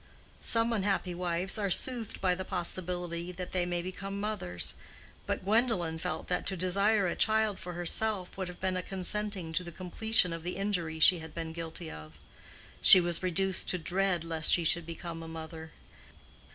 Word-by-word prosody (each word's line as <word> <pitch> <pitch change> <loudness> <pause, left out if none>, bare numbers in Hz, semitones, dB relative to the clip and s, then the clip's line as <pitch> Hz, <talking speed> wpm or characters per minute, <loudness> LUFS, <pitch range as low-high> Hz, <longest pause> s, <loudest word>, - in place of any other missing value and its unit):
Some 230 0 +2
unhappy 195 -3 0
wives 180 +3 -1
are 200 -2 0
soothed 235 +3 0
by 185 -2 +3
the 185 +1 -4
possibility 175 -1 -2
that 180 0 -6
they 180 -1 0
may 175 -1 -2
become 195 +2 -5
mothers; 200 - +1 0.5
but - - -2
Gwendolen 195 -6 +1
felt 160 - -4
that 180 - -1
to 190 - -2
desire 200 +3 +2
a 175 - -1
child 220 -2 +2
for 180 - -7
herself 180 +2 0
would 190 -1 -4
have 180 0 -9
been 190 -1 -1
a 185 - -1
consenting 190 -2 -3
to 180 - 0
the 170 - -8
completion 185 +1 +2
of 165 - -5
the 175 +2 -4
injury 180 -5 -2
she 175 +3 +6
had 160 -1 -10
been 165 -1 -5
guilty 165 0 -6
of. 75 0 -10 0.7
She 190 - +11
was 175 -1 -1
reduced 185 +1 0
to 180 - +1
dread 180 +1 0
lest 165 -1 -1
she 175 - +4
should 165 +1 +2
become 165 0 -7
a 165 - -8
mother. 160 0 -8
180 Hz, 180 wpm, -30 LUFS, 170-195 Hz, 0.7 s, She